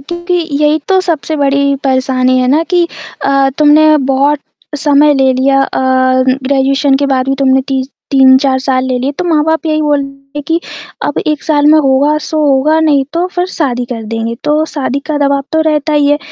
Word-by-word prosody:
क्योंकि 345 +5 -4 0.3
यही 300 +1 +2
तो 380 -1 +3
सबसे 320 -3 -3
बड़ी 280 -1 +1
परेशानी 260 -1 +1
है 255 - +1
ना 300 +4 +2
कि 350 -2 +2 0.4
अ, 275 0 +2
तुमने 305 +1 +5
बहुत 275 +1 +1 0.4
समय 295 +1 +3
ले 265 -1 +2
लिया। 270 +1 +1
अ, - - -3 0.6
ग्रेजुएशन 275 +1 +1
के 280 0 -1
बाद 265 -1 -1
भी 270 - +1
तुमने 265 -1 +2
ती 265 -1 -1 0.3
3-4 265 0 +4
साल 260 -1 -1
ले 255 -1 -1
लिए, 265 +3 -2
तो 360 +5 -5
माँ-बाप 320 0 0
यही 310 -1 0
बोलते 275 -1 -3
हैं 290 - -4
कि 330 +1 0 0.5
अब 290 - -3
1 305 -1 -1
साल 295 -2 +1
में 310 - +5
होगा 280 +1 +2
सो 315 - -3
होगा 285 +3 +2
नहीं 295 -4 +2
तो 340 +2 -1
फिर 355 0 -1
शादी 260 -9 -2
कर 230 - -6
देंगे। 230 0 -3
तो 300 +1 +1
शादी 280 -3 -3
का 305 -2 -2
दबाव 280 -1 0
तो 320 - +1
रहता 305 0 -1
ही 295 -1 +2
है। 290 - +2
280 Hz, 195 wpm, -11 LUFS, 270-305 Hz, 0.6 s, तुमने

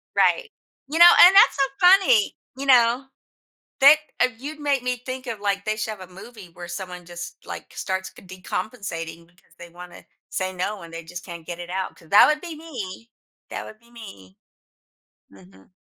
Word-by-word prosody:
Right. 480 -3 +2 0.4
You 320 +3 -2
know, 345 0 +10 0.2
and 375 +2 +6
that's 400 - +7
so 275 - +1 0.2
funny, 360 - +5 0.2
you 275 - -5
know, 245 0 +4 0.8
thick 285 +3 +8 0.2
of 250 -3 0
You'd 300 +2 -8
make 280 -3 0
me 250 -1 -3
think 255 0 -6
of, 225 -4 -6
like, 200 -1 -2
they 215 0 -2
should 220 0 -3
have 185 - -11
a 185 - -20
movie 195 -1 -13
where 175 0 -10
someone 180 -1 -7
just, 175 0 -8
like, - - -9
starts 190 -1 -4
ca - - -17
decompensating 180 -3 -6
because 175 +1 -28
they 170 0 -12
wanna 175 +1 -13 0.3
say 185 0 -3
no 185 +1 -4
and 165 0 -12
they 165 0 -8
just 175 +1 -9
can't 170 -3 -10
get 175 -1 -6
it 175 0 -8
out, 190 0 -4
'cause 165 - -20
that 205 - +8
would 300 0 +1
be 340 -3 -8
me! 235 - -9 0.4
That - - -5
would 215 - -12
be 235 +1 -25
me. 195 - -13 1.0
Mhm. 95 0 -19
200 Hz, 195 wpm, -23 LUFS, 175-255 Hz, 1.0 s, know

